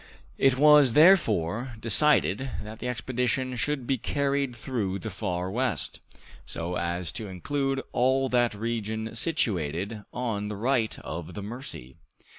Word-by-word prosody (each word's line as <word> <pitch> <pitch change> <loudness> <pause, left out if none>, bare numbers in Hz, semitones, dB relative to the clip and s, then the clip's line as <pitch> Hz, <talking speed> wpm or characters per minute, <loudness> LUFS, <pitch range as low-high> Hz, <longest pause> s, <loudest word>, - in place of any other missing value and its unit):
It 135 -1 +4
was, 150 -3 +6
therefore, 120 - +4
decided 130 +1 +3
that 110 +1 -9
the - - -4
expedition 125 +1 -1
should 135 +2 -1
be 130 0 0
carried 140 -1 -1
through 110 -6 -2
the 110 +2 -6
Far 90 -1 -3
West, 125 +4 -1 0.4
so 85 +2 -5
as 85 0 -1
to 110 -3 -5
include 135 +8 -2
all 130 +2 +2
that 120 -3 +2
region 110 0 -3
situated 105 - -1
on 115 -5 -2
the 105 - -4
right 115 +1 0
of 80 0 -7
the 105 - -5
Mercy. 100 - -8
115 Hz, 135 wpm, -27 LUFS, 100-130 Hz, 0.4 s, was